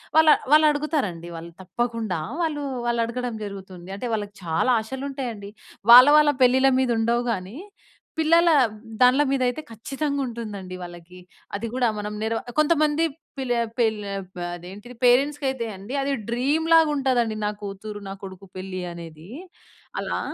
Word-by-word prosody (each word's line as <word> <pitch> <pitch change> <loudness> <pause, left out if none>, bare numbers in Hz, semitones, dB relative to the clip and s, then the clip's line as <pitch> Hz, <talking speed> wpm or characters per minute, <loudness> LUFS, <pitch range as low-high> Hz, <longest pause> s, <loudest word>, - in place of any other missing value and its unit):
వాళ్ళు 315 -1 +7 0.2
వాళ్ళు 310 +1 +7
అడుగుతారండి 280 - -2
వాళ్ళు 170 +1 -8
తప్పకుండా 230 0 -2 0.2
వాళ్ళు 305 -3 -1 0.2
వాళ్ళు 235 -1 +1
అడగడం 240 0 -4
జరుగుతుంది. 190 -3 -9
అంటే 205 - -6
వాళ్ళకి 205 -2 -3
చాలా 165 +9 +1
ఆశలు 265 +5 -6
ఉంటాయండి. 235 -7 -5 0.4
వాళ్ళ 250 +3 +11
వాళ్ళ 300 -1 +5
పెళ్ళిళ్ళ 260 +2 +5
మీద 260 -1 +1
ఉండవు 235 +2 +1
గాని, 195 +3 -5 0.6
పిల్లల 335 +2 +4 0.5
దాన్ల 250 +3 +6
మీద 275 -1 0
అయితే 280 +5 -5
ఖచ్చితంగా 280 +5 -3
ఉంటుందండి 210 -6 -7
వాళ్ళకి. 175 +1 -11 0.4
అది 230 - -4
గూడా 250 -2 +2
మనం 210 0 -4
నెర 225 +1 -1 0.3
కొంతమంది 305 0 +3 0.4
పిల 260 -2 -3 0.3
పెళ్లే 215 -3 0
అప్ 185 -1 -12 0.2
అదేంటిది 200 +8 -11
పేరెంట్స్‌కి 275 +4 +3
అయితే 250 -3 -4
అండి 200 +8 -7
అది 280 0 0 0.2
డ్రీమ్‌లాగ 315 +6 +3
ఉంటాదండి 245 -5 +1
నా 210 - 0
కూతురు, 205 +1 -7
నా - - -4
కొడుకు 190 0 -9
పెళ్లి 185 0 -5
అనేది. 165 0 -11 0.7
అలా. - - -2
235 Hz, 145 wpm, -24 LUFS, 195-275 Hz, 0.7 s, వాళ్ళ